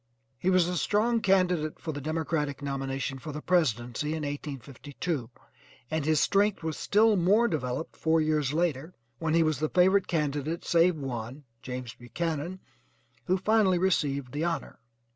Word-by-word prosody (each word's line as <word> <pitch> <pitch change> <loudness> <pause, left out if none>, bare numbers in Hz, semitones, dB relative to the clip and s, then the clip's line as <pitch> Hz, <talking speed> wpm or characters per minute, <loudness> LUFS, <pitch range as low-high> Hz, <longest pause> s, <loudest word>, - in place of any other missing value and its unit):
He 180 - +1
was 185 -2 +4
a 180 0 -1
strong 225 +6 +1
candidate 180 -6 +2
for 160 - -4
the 145 -1 -6
Democratic 155 -2 -2
nomination 135 -1 -3
for 155 +4 -7
the 150 - -5
presidency 150 -3 0
in 155 - -4
1852, 145 0 -5 0.6
and 160 -1 0
his 155 -1 +3
strength 200 0 +2
was 160 -2 -2
still 215 +1 +3
more 200 +6 +4
developed 140 - -3
four 160 0 +2
years 155 -3 +1
later 160 0 -1 0.2
when 160 0 0
he 165 - +5
was 155 -3 0
the 155 0 0
favorite 185 +1 +4
candidate 150 0 -2
save 170 +1 +4
one, 130 -1 -5 0.2
James 125 -2 -6
Buchanan, 165 +7 -4 0.6
who 185 - +2
finally 200 -2 +3
received 145 -8 0
the 145 +3 -2
honor. 170 -1 -3
155 Hz, 155 wpm, -28 LUFS, 140-180 Hz, 0.6 s, he